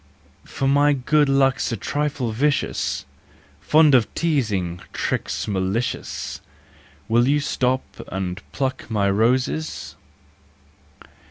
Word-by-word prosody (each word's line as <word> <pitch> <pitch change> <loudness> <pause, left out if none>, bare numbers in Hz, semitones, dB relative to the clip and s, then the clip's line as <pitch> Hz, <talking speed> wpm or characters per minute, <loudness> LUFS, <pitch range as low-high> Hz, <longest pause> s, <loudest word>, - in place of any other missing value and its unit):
For 135 - -2
my 145 +1 +4
good 145 +2 +2
luck's 135 -2 +2
a 115 - -2
trifle 140 0 -2
vicious, 140 +6 0 0.5
Fond 150 - +5
of 125 -4 +4
teasing, 105 - 0
tricks - - -2
malicious— 100 +4 -2 0.7
Will 120 +2 +3
you 145 +2 +3
stop 130 -2 0 0.3
and 95 +1 -4
pluck 135 -3 -3
my 105 -3 +1
roses 125 +8 0
130 Hz, 100 wpm, -22 LUFS, 110-145 Hz, 0.7 s, Fond